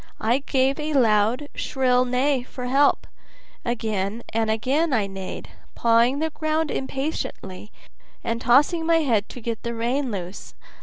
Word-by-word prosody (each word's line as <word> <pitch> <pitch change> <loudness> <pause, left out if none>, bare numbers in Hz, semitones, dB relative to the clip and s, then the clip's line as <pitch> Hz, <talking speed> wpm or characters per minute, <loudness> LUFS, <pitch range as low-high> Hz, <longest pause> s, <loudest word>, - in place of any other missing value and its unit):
I 235 +4 +2
gave 270 0 +1
a 305 0 -2
loud, 230 +1 +3
shrill 255 -2 +1
neigh 255 +2 +1
for 250 0 -8
help; 275 +3 +3 0.6
again 220 -2 -2
and 225 0 +1
again 270 +8 +1
I 220 -5 +2
neighed, 195 -1 -7 0.3
pawing 235 +3 +3
the 320 +2 -1
ground 310 0 -1
impatiently, 265 -8 -4 0.5
and 230 +1 -2
tossing 295 +8 +4
my 330 -1 +4
head 225 -8 +1
to - - -9
get 230 -1 -4
the 235 0 -4
rein 250 +4 -1
loose. 185 -3 -7
250 Hz, 145 wpm, -24 LUFS, 225-280 Hz, 0.6 s, tossing